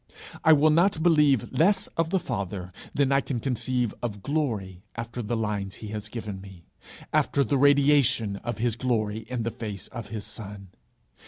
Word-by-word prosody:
I 160 - +6
will 155 0 +6
not 165 0 +3
believe 150 -7 +4
less 195 +5 +3
of 165 -1 +1
the 190 - +2
Father 95 - -4 0.2
than 140 -1 +1
I 135 0 +4
can 130 -4 -3
conceive 125 -1 -1
of 105 -5 -4
glory 110 - -2
after 115 +1 -5
the 115 +1 -2
lines 105 -3 -2
he 110 - -8
has 105 -1 -5
given 105 -5 -6
me, 95 -4 -13 0.5
after 140 - +3
the 135 +2 +1
radiation 140 -7 +4
of 120 +1 -4
his 115 -1 0
glory 110 -3 -1
in 125 -2 -2
the 115 - -1
face 110 -3 -6
of 115 -4 -7
his 110 -2 -5
Son. 100 -3 -9
115 Hz, 175 wpm, -26 LUFS, 105-140 Hz, 0.5 s, I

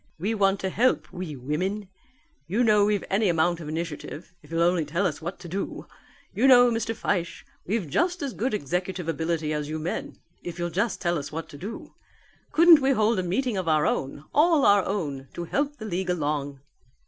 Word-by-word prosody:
"We 200 +7 -1
want 195 -2 +2
to 190 - -2
help, 250 +6 +1
we 175 -4 -5
women. 180 +10 -3 0.6
You 210 +8 +1
know 210 -3 +5
we've 205 -1 +1
any 200 +1 +2
amount 170 +1 +2
of 155 -3 -7
initiative, 160 +1 -6
if 150 - -18
you'll 165 +1 +1
only 175 -1 +2
tell 170 +7 -1
us 150 -4 -2
what 175 +3 -5
to 175 - -8
do. 195 +4 -4 0.5
You 250 +5 +3
know, 245 -2 +7
Mr. 225 0 -1
Fyshe, 175 -5 -2 0.2
we've 205 -2 -1
just 350 - 0
as 270 -4 -3
good 240 +1 -1
executive 180 +2 -3
ability 160 -1 -1
as 150 -1 -3
you 155 - -3
men, 160 +3 -4 0.2
if 175 -1 -7
you'll 175 0 -2
just 205 +7 -1
tell 170 -3 +1
us 140 - -7
what 160 +1 -5
to 145 - -10
do. 210 +6 -7 0.6
Couldn't 335 -2 +7
we 270 +1 +3
hold 220 -3 +2
a - - +2
meeting 205 +6 -1
of 185 -2 -3
our 155 -2 +3
own, 140 +2 -2
all 310 -1 +4
our 200 -1 +5
own, 145 -9 -3
to 175 - -4
help 285 - -1
the 220 - -8
league 185 -2 -2
along?" 145 -5 -2
180 Hz, 205 wpm, -26 LUFS, 160-215 Hz, 0.6 s, know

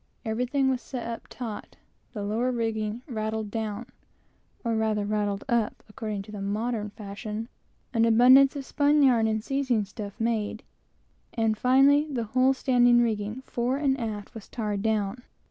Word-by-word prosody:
Everything 250 +5 0
was 260 -2 0
set 250 -3 -6
up 230 0 -6
taut, 230 -4 -7 0.4
the 210 -4 -5
lower 225 +5 0
rigging 225 -1 -2
rattled 220 -3 -3
down, 220 0 -3 0.8
or 230 -2 0
rather 215 -2 0
rattled 205 -1 -1
up, 235 -4 0
(according 210 -2 -5
to 210 - -12
the 205 -2 -6
modern 210 +2 -2
fashion,) 210 +1 -6 0.5
an 230 -2 +3
abundance 255 +5 +6
of 275 -2 -5
spun 290 +1 +3
yarn 235 -4 +4
and 220 -1 -1
seizing 260 -5 0
stuff 200 0 -8
made, 225 -2 -1 0.7
and 225 -1 +1
finally, 275 +6 +4
the 250 -5 -2
whole 255 +4 +2
standing 245 -2 +4
rigging, 220 +1 -1
fore 245 +2 -1
and 275 -2 +1
aft, 215 -3 -5
was 220 -3 -10
tarred 210 -4 -3
down. 215 +1 -1
225 Hz, 155 wpm, -27 LUFS, 210-250 Hz, 0.8 s, abundance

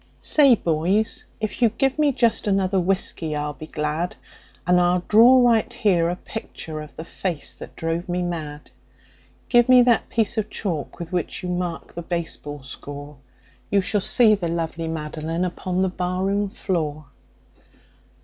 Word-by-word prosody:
"Say, 280 -5 +5
boys, 180 +5 0
if 215 +2 -4
you 235 - +6
give 270 +6 0
me 295 -2 +4
just 235 -4 +1
another 195 -1 +2
whiskey 175 -4 -1
I'll 150 0 -2
be 155 +2 -10
glad, 155 +3 -2 0.5
And 180 +1 +4
I'll 175 0 +2
draw 245 +3 +7
right 230 -1 +2
here 190 -8 +2
a 175 - -1
picture 160 -6 -7
of 150 -1 -11
the 160 - -7
face 175 -4 -4
that - - -11
drove 165 +2 -3
me 180 0 0
mad. 155 -4 -5 0.8
Give 240 0 +4
me 250 -1 +8
that 240 -2 +2
piece 225 -1 0
of 215 0 -3
chalk 170 -10 -4
with 170 0 -7
which 180 +2 -2
you 180 - -3
mark 180 -2 -3
the 170 - -5
baseball 165 -4 -5
score 145 +2 -9 0.5
You 200 - +3
shall 205 +2 0
see 220 +2 +5
the 190 -5 -1
lovely 165 0 -3
Madeline 160 +2 -3
upon 180 +1 -2
the 190 - +3
barroon 185 +3 -1
floor." 155 -6 -3
180 Hz, 160 wpm, -23 LUFS, 160-210 Hz, 0.8 s, me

